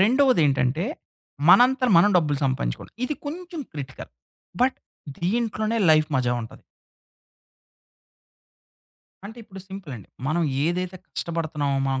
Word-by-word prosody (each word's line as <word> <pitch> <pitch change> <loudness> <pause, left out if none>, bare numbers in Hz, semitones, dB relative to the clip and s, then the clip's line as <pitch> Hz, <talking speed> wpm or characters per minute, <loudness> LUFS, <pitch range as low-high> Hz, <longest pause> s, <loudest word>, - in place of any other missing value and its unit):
రెండోదేంటంటే, 175 - +3 0.6
మనంతర 255 +1 +6
మనం 205 +5 +6
డబ్బులు 150 -5 +1
సంపాదించుకోవం. 130 - -2
ఇది 300 - -2
కొంచెం 340 +1 -6
క్రిటికల్. 135 -3 -7 0.5
బట్ 260 +1 +2 0.4
దీంట్లోనే 220 +3 0
లైఫ్ 155 0 +4
మజా 125 -1 +1
ఉంటది. 110 - -11 2.6
అంటే, 220 +3 -11
ఇప్పుడు 195 -3 -11
సింపులండి. 150 - -9 0.2
మనం 170 +3 +1 0.2
ఏదైతే 180 +2 -1
కష్టపడుతున్నామో 155 -4 -2
మనం 135 0 0
175 Hz, 100 wpm, -24 LUFS, 145-230 Hz, 2.6 s, మనంతర